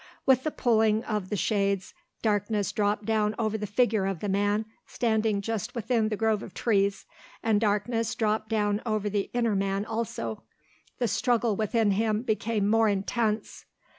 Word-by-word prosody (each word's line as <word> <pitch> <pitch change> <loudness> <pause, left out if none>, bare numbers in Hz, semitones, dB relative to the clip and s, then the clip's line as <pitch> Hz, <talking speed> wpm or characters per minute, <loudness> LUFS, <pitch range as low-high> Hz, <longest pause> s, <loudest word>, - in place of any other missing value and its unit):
With 260 -1 +4
the 310 - 0
pulling 220 -5 +2
of 210 -4 -3
the 210 - -1
shades 200 -2 0 0.3
darkness 205 -1 0
dropped 205 0 0
down 215 -1 +1
over 220 -2 0
the 210 -1 -3
figure 215 -2 +2
of 195 -4 -2
the 205 - -3
man 205 +2 +1 0.2
standing 220 -3 0
just 225 +2 -3
within 230 -1 +1
the 215 - -2
grove 220 -1 +1
of 185 - -10
trees 200 -3 +1 0.4
and 220 -2 +2
darkness 220 +2 0
dropped 215 -1 0
down 210 -1 +1
over 215 -3 -1
the 200 -1 -1
inner 235 -3 +1
man 195 +1 0
also. 220 - -4 0.6
The 245 - 0
struggle 235 -2 +1
within 220 0 +1
him 215 +2 +1
became 220 -2 0
more 225 +1 +4
intense. 210 +2 -1
215 Hz, 165 wpm, -27 LUFS, 205-225 Hz, 0.6 s, With